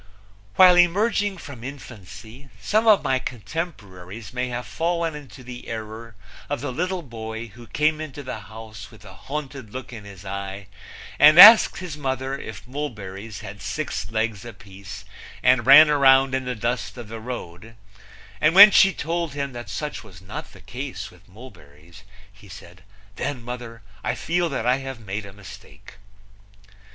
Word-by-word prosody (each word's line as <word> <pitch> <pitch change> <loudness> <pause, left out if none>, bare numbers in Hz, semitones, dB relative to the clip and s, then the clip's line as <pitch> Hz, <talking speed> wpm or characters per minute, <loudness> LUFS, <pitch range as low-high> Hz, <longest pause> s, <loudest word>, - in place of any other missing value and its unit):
While 180 -1 +7
emerging 200 +3 +2
from 140 -8 -11
infancy 120 -1 -11
some 215 - 0
of 215 -2 +5
my 130 -1 +1
contemporaries 110 - -7
may 125 0 -2
have 125 0 -5
fallen 170 -1 -2
into 140 -3 -11
the 125 0 -10
error 110 0 -8 0.3
of 145 - -2
the 145 +1 -4
little 180 +5 -3
boy 110 -2 -7
who 120 +3 -15
came 155 +3 0
into 145 -2 -8
the 125 -4 -6
house 110 0 -11
with - - -17
a - - -12
haunted 135 -5 -7
look 130 0 -8
in 110 -3 -9
his 100 -1 -12
eye 100 +1 -6 0.5
and 155 +2 +7
asked 220 +4 +10
his 175 -5 -7
mother 135 -1 -3
if 110 -3 -9
mulberries 110 -7 -7
had 100 -2 -10
six 155 -1 -4
legs 110 -3 -2
apiece 100 -4 -11 0.4
and 125 -2 +3
ran 150 +3 +10
round 135 -2 +4
in 130 -1 -1
the 125 0 -3
dust 120 +3 -3
of 120 -3 -8
the 115 +1 -8
road, 110 -3 -8 0.7
and 155 +3 +3
when 205 +2 +11
she 195 0 +5
told 170 -2 -3
him 140 -2 -4
that 120 -4 -8
such 145 +5 -5
was 95 -7 -14
not 95 - -9
the - - -16
case - - -7
with - - -22
mulberries 85 - -16 0.3
he 100 0 -18
said: 90 0 -13 0.4
"Then, 130 -5 -4
mother, 120 -2 -8 0.2
I - - -1
feel 175 0 -1
that 130 -6 -3
I 125 +1 +3
have 135 -2 -7
made 105 -1 -6
a - - -11
mistake." 100 0 -14
125 Hz, 165 wpm, -23 LUFS, 105-145 Hz, 0.7 s, when